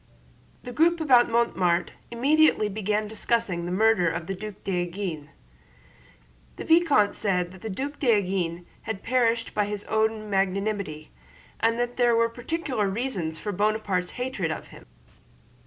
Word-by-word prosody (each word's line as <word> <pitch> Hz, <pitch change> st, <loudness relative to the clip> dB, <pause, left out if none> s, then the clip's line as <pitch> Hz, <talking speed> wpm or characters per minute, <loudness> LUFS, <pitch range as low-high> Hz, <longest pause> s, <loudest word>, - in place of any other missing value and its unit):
The 245 Hz, -, -7 dB
group 335 Hz, +6 st, +3 dB
about 255 Hz, -6 st, +5 dB
Mortemart 185 Hz, -7 st, +1 dB, 0.2 s
immediately 275 Hz, -1 st, +3 dB
began 210 Hz, +1 st, -1 dB
discussing 215 Hz, -5 st, -1 dB
the -, -, -3 dB
murder 205 Hz, -2 st, +3 dB
of 160 Hz, -, -4 dB
the 195 Hz, -, -3 dB
Duc 210 Hz, +2 st, -7 dB
d'Enghien. 175 Hz, -4 st, -3 dB, 1.3 s
The -, -, -7 dB
vicomte 325 Hz, -11 st, +4 dB
said 180 Hz, -4 st, -1 dB
that 185 Hz, -1 st, -14 dB
the 220 Hz, -, -5 dB
Duc 275 Hz, +8 st, -5 dB
d'Enghien 190 Hz, -, 0 dB, 0.2 s
had 210 Hz, -3 st, -4 dB
perished 235 Hz, -2 st, +1 dB
by 210 Hz, -, +1 dB
his 205 Hz, 0 st, -4 dB
own 220 Hz, 0 st, 0 dB
magnanimity, 195 Hz, -5 st, -2 dB, 0.5 s
and 230 Hz, +1 st, +2 dB
that 245 Hz, 0 st, -2 dB
there 240 Hz, -2 st, +4 dB
were 230 Hz, 0 st, +3 dB
particular 245 Hz, -, -2 dB
reasons 195 Hz, -8 st, -3 dB
for 205 Hz, -, -4 dB
Buonaparte's 205 Hz, -2 st, -1 dB
hatred 245 Hz, -9 st, -2 dB
of -, -, -6 dB
him. -, -, -15 dB
210 Hz, 140 wpm, -26 LUFS, 185-235 Hz, 1.3 s, about